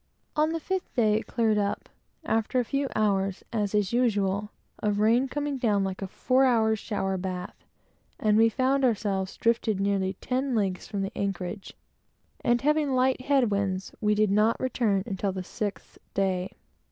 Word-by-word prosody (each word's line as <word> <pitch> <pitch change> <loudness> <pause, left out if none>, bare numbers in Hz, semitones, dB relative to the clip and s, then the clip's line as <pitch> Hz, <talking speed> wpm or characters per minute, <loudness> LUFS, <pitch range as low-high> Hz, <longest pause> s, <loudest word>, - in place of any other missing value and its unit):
On 305 +1 +3
the 330 - -2
fifth 375 +3 -3
day 215 -3 +3
it - - -10
cleared 220 -3 +1
up, 200 0 -2 0.4
after 225 +3 +1
a - - +2
few 275 +3 -1
hours, 195 -2 +1
as 210 -2 0
is 205 0 +1
usual, 210 -4 +1 0.3
of 205 -1 0
rain 230 +5 +3
coming 290 0 -3
down 210 -5 +2
like 190 0 -4
a 195 - -3
four 255 +7 +2
hours' 220 -4 +3
shower 195 -3 -2
bath, 180 -1 -5 0.6
and 210 -1 +3
we 225 +1 +5
found 265 +3 +1
ourselves 200 -5 0
drifted 230 -3 +1
nearly 195 -1 0
ten 255 +6 -2
leagues 195 -4 -1
from 200 -1 -3
the 195 - -5
anchorage; 195 0 -4 0.7
and 240 0 +2
having 295 -1 +2
light 255 0 +2
head 270 -6 +3
winds, 195 -1 -1
we 210 -1 +2
did 210 -1 +2
not 210 +3 +3
return 225 -6 +1
until 195 -2 -2
the 185 0 -5
sixth 205 +2 -5 0.2
day. 190 -1 0
210 Hz, 170 wpm, -27 LUFS, 195-250 Hz, 0.7 s, we